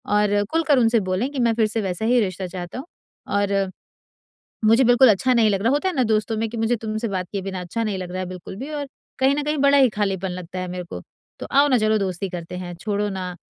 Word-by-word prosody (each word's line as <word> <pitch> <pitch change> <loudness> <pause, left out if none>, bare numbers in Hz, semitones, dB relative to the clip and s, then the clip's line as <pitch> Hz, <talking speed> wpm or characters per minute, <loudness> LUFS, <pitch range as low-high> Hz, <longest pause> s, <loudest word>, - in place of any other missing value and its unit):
और 205 0 +3
खुल 330 +1 +1
कर 285 -4 +5
उनसे 230 -1 +4
बोलें 195 +8 0
कि 285 - -4
मैं 235 -2 +3
फिर 220 -1 +3
से 220 +1 -1
वैसा 190 +1 -3
ही 245 +2 +4
रिश्ता 185 -1 -3
चाहता 175 +1 -7
हूँ 275 - -7 0.5
और 195 -1 0 0.9
मुझे 230 +4 +5
बिल्कुल 245 +2 +6
अच्छा 225 +5 +3
नहीं 225 -2 +4
लग 195 -1 0
रहा, 230 - +3
होता 295 +6 +1
है 370 - -2
ना 260 - +2
दोस्तों 215 0 0
में 225 +1 -1
कि 235 - -6
मुझे 225 +2 +1
तुमसे 220 +1 -3
बात 185 -2 -3
किए 200 -2 -3
बिना 190 -1 -4
अच्छा 180 +6 -3
नहीं 200 -3 -2
लग 180 -1 -6
रहा 185 - -3
है 185 - -3
बिल्कुल 185 +1 -8
भी 270 +5 -6
और 290 -1 -3 0.3
कहीं 270 +1 +3
न 295 - -1
कहीं 300 +1 -1
बड़ा 280 +1 +5
ही 265 -2 +6
खालीपन 195 -3 -1
लगता 180 0 -7
है 185 - -4
मेरे 180 0 -5
को। - - -8 0.4
तो - - -5
आओ 280 +2 +5
ना 255 -3 +4
चलो 215 0 +2
दोस्ती 190 -1 -2
करते 175 0 -6
हैं, 175 -1 -6
छोड़ो 205 +3 -2
ना 185 -2 -5
210 Hz, 260 wpm, -22 LUFS, 185-240 Hz, 0.9 s, बिल्कुल